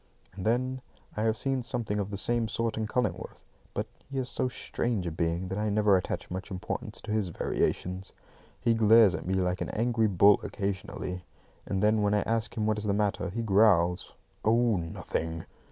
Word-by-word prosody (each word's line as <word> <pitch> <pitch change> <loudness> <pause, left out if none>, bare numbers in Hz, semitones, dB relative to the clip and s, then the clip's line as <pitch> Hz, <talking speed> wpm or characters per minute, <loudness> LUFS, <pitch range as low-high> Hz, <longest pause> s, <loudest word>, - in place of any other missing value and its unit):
And 95 +2 -4
then 130 +3 0 0.3
I 105 - -2
have 110 0 +1
seen 135 0 0
something 115 -4 -1
of 100 -1 -2
the 100 - -4
same 115 +3 +1
sort 115 +1 -1
in 110 -1 -2
Cullingworth; 125 +2 -2 0.4
but - - -1 0.2
he 135 - -5
is 130 -1 -2
so 130 +1 +1
strange 120 -5 -2
a 85 - -2
being 85 +2 -1
that 95 +2 -3
I 105 0 0
never 105 -1 +4
attach 90 - -2
much 95 +1 -5
importance 90 -1 -5
to - - -6
his 105 -4 0
variations. 90 +3 -2 0.5
He 120 -1 +2
glares 110 -2 +6
at 80 - -5
me 95 - +1
like 90 0 0
an - - -2
angry 115 0 +1
bull 100 +1 +5
occasionally; 95 -2 -4 0.4
and 95 +1 -1
then 105 0 +4
when 105 0 +2
I 105 - +2
ask 115 +2 -1
him 110 - 0
what 110 -1 +1
is 105 - -4
the 100 - +1
matter, 100 -2 0
he 115 +5 -3
growls 95 -4 +3 0.3
out, - - +3
"Oh, 115 -2 +3
nothing!" 80 -1 -4
105 Hz, 200 wpm, -29 LUFS, 95-115 Hz, 0.5 s, glares